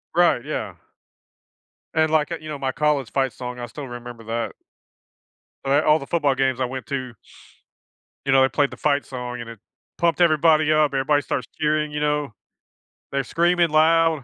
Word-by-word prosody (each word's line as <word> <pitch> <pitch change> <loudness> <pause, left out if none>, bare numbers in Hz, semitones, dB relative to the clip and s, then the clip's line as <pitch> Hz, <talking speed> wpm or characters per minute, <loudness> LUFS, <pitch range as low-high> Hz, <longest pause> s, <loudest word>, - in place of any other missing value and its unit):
Right, 175 -8 +4
yeah. 110 -10 -4 1.2
And, 160 0 +2
like, 155 0 +2
uh, 170 - -2
you 155 - -9
know, 150 - -4
my 135 -1 -1
college 140 -3 0
fight 135 -2 0
song, 125 -1 -7
I 120 - -4
still 135 +4 -8
remember 120 -1 -9
that. 115 +1 -2 1.1
But 135 - -1
I 145 +2 +4
all 155 +1 +5
the 140 - -9
football 150 -5 +1
games 130 -1 0
I - - +2
went 130 0 -6
to 130 -4 -4 1.1
you 135 - +1
know, 135 0 +6
they 130 - +4
played 145 0 +1
the - - -9
fight 145 -1 +1
song, 125 -1 -6
and 115 - -8
it 115 -2 -10 0.4
pumped 170 -1 +1
everybody 155 -2 +4
up. 155 -2 +3
Everybody 145 +2 +2
starts 125 - -3
cheering, 150 0 +1
you 150 - -3
know. 150 -4 -1 0.8
They're 140 0 0
screaming 170 +4 +2
loud. 160 -1 +3
145 Hz, 185 wpm, -23 LUFS, 130-155 Hz, 1.2 s, know